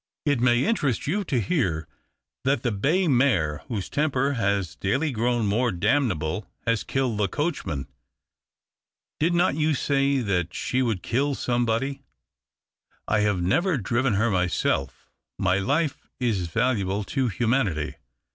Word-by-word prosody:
It 145 -4 +2
may 120 0 +3
interest 150 - 0
you 200 +8 0
to 130 - 0
hear 95 - 0 0.6
that 135 -2 +1
the 120 - +1
bay 155 - +1
mare, 115 - +2
whose 105 -6 -3
temper 140 -2 0
has 100 - 0
daily 135 - 0
grown 120 -1 0
more 115 +4 +1
damnable, 90 - 0 0.2
has 115 -1 +1
killed 130 -5 -1
the 105 - +2
coachman. 90 - -3 1.3
Did 170 +3 +2
not 175 -2 +3
you 155 +1 +1
say 140 0 +1
that 90 -5 -1
she 130 - 0
would 110 -8 -1
kill 140 +4 0
somebody? 120 +3 -1 1.0
1 105 0 +1
have 100 -4 +1
never 170 - +2
driven 120 +1 0
her 110 +3 +2
myself 90 -2 -1
— - - -63
my 95 0 +2
life 145 +7 -1
is 110 -8 0
valuable 105 0 0
to 130 +5 -1
humanity. 110 - 0
120 Hz, 140 wpm, -25 LUFS, 100-140 Hz, 1.3 s, may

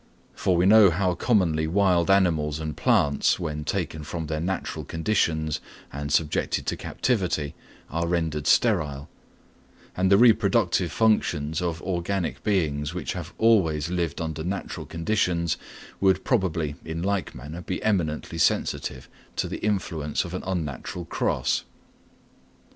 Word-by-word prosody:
For 90 - +1
we 85 +1 +3
know 105 0 +8
how 90 +2 +1
commonly 85 -8 +1
wild 90 -1 +2
animals 80 -6 +2
and 80 -2 -4
plants, 70 +5 +2
when 75 -3 -3
taken 75 +1 -3
from 80 +2 -4
their 75 0 -3
natural 95 +3 -3
conditions 80 -4 0 0.3
and 70 0 -4
subjected 75 -1 0
to - - -1
captivity, 90 - -1 0.3
are 85 +2 -2
rendered 80 -4 -1
sterile; 70 -1 +2 0.9
and 95 +1 +1
the 100 - +7
reproductive 105 -6 +3
functions 80 -8 +1
of 85 -2 -3
organic 90 0 -2
beings 80 -6 0
which 80 -8 -3
have - - -7
always 85 -9 +3
lived 85 -4 -1
under 80 -1 -3
natural 95 +3 -4
conditions 85 -2 0 0.4
would 95 -1 +3
probably 85 - 0
in 80 +1 -4
like 100 -1 -1
manner 75 +8 -8
be 90 +1 -4
eminently 80 -6 -1
sensitive 75 - 0 0.3
to - - -1
the - - -4
influence 85 -8 -1
of 85 - -7
an 90 - -3
unnatural 85 -1 -4
cross. 65 -4 0
85 Hz, 135 wpm, -25 LUFS, 75-95 Hz, 0.9 s, know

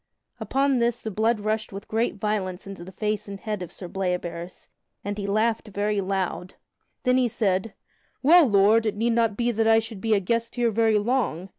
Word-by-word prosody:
Upon 270 -1 +1
this 235 0 +1
the 220 - -5
blood 220 +2 +1
rushed 215 +1 -2
with 195 0 -8
great 225 +2 0
violence 200 -3 -3
into 195 -3 -8
the 185 - -10
face 210 +2 -2
and 200 -1 -7
head 210 -3 -4
of 180 - -6
Sir 180 - -6
Bleoberis, 180 -2 -4 0.4
and 205 +1 -3
he 200 -1 -4
laughed 220 +2 0
very 205 0 -1
loud. 185 -1 -3 0.5
Then 250 -1 +3
he 255 -1 +3
said: 200 -2 -1 0.5
"Well, 325 +2 +7
Lord, 215 +2 +4
it 210 - -1
need 230 +2 +1
not 225 -3 +1
be 240 0 +1
that 225 0 +1
I 225 0 +6
should 225 -3 -3
be 225 -1 +2
a - - +3
guest 230 +4 -1
here 240 -2 +1
very 220 0 +3
long. 205 -6 -1
215 Hz, 200 wpm, -25 LUFS, 195-230 Hz, 0.5 s, Well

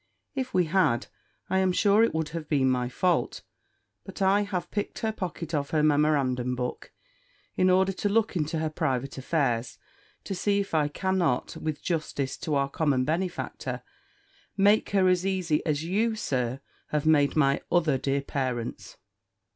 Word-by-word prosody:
"If 260 -2 -3
we 180 -1 +2
had, 155 -8 +2 0.4
I 190 +1 +1
am 190 -1 +3
sure 205 +3 +4
it 230 - +3
would 160 -1 -2
have 165 -2 -6
been 135 -3 +3
my 125 -1 0
fault: 180 +7 0 0.6
but 195 - -10
I 195 +1 +4
have 185 -4 -3
picked 205 -1 -3
her 220 - +1
pocket 175 -5 -5
of 145 -2 -1
her 155 -1 +1
memorandum 140 -5 +2
book, 125 0 -5 0.6
in 185 - +3
order 190 +1 +4
to 205 +2 -2
look 220 0 +1
into 160 -1 -1
her 160 0 -1
private 135 -2 -2
affairs, 130 -5 -1 0.5
to - - -4
see 200 +2 +1
if 200 - -4
I 150 -2 +3
cannot, 180 -3 0
with 155 -2 -4
justice 155 -5 -2
to 155 - -2
our 140 0 +2
common 140 -3 +1
benefactor, 175 +5 -3 0.7
make 205 +2 +4
her 195 -2 +3
as 180 -1 +3
easy 185 -5 0
as 150 0 0
you. 215 +7 0
Sir, 130 - -2 0.3
have 150 -1 -1
made 145 -3 +4
my 140 -3 +3
other 160 -6 +2
dear 140 +1 -1
parents." 130 -4 -4
160 Hz, 165 wpm, -27 LUFS, 140-190 Hz, 0.7 s, sure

